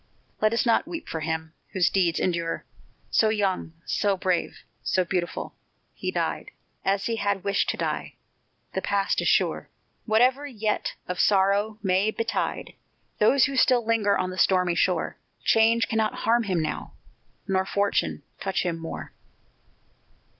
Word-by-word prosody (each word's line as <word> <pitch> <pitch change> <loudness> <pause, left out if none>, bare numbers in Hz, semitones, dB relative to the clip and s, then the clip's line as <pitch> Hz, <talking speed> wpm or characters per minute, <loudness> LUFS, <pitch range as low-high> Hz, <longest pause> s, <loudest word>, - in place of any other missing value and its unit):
Let 215 0 +4
us 230 +3 +1
not 235 +6 +3
weep 335 -1 -6
for 160 - -4
him, 160 0 -3 0.2
whose 185 -3 +2
deeds 175 -4 +2
endure! 170 -2 -1 0.5
So 220 - +4
young, 195 -6 -1
so 200 -2 +1
brave, 185 -2 -1 0.2
so 185 -1 +1
beautiful! 175 -1 -3 0.4
He - - -4
died - - -2 0.3
As 195 0 +1
he 230 -1 -1
had 200 -3 -1
wished 200 - +1
to - - -1
die; - - -3 0.6
the 190 - -1
past 200 0 +1
is - - -1
sure; - - +2 0.4
Whatever 250 +6 +3
yet 215 -5 -2
of 180 0 -4
sorrow 200 +2 +3
may 190 +2 +2
betide 225 +1 -2 0.5
Those 255 +6 +5
who 275 - -3
still 250 -2 +4
linger 220 -3 +2
by 185 - +1
the 185 0 -5
stormy 180 -2 +3
shore, 180 +1 0 0.2
Change 225 +1 +4
cannot 220 -1 0
harm 230 +1 +3
him 175 -4 +1
now, - - -4 0.5
nor 190 -1 +2
fortune 200 +1 0 0.2
touch 195 -1 -1
him 170 -2 -2
more. 165 0 -7
200 Hz, 150 wpm, -26 LUFS, 185-220 Hz, 0.6 s, Those